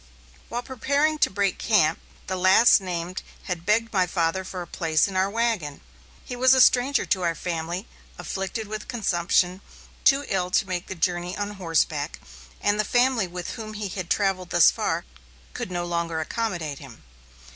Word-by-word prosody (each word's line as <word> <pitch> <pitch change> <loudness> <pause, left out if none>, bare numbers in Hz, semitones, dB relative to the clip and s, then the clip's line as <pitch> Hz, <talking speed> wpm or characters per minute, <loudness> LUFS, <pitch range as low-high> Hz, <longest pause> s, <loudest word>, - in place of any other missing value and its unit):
While 240 +1 -3
we - - -17
were 260 - -6
preparing 290 +5 +1
to - - +4
break 200 0 -1
camp, 180 -8 +2 0.3
the 185 - -3
last 190 +5 +6
named 180 -1 -4 0.2
had 175 -2 -5
begged 225 +2 +2
my 185 -2 +2
father 170 +1 0
for 185 -1 -6
a - - -10
place 165 -1 +1
in 195 - -7
our 190 +1 +2
wagon. 215 -10 -1 0.5
He 245 - -6
was 260 +1 +5
a - - +3
stranger 255 +2 +4
to 190 - 0
our 170 -2 0
family, 170 +4 -4 0.3
afflicted 195 +3 -4
with 215 0 -6
consumption, 180 -4 +1 0.4
too 280 +1 +4
ill 180 -2 -1
to 185 - +1
make 180 -1 -3
the 190 - -5
journey 175 +1 -1
on 205 0 -3
horseback, 165 -5 -1 0.4
and 205 +1 +1
the - - +3
family 245 -2 +2
with 180 0 -6
whom 215 -2 -7
he 205 -1 -4
had 185 -1 -5
travelled 190 -3 0
thus 175 -2 +6
far - - -2 0.5
could - - -5
no 175 -1 -3
longer 170 -1 -2
accommodate 165 -5 -3
him. 125 - -13
185 Hz, 180 wpm, -25 LUFS, 175-215 Hz, 0.5 s, last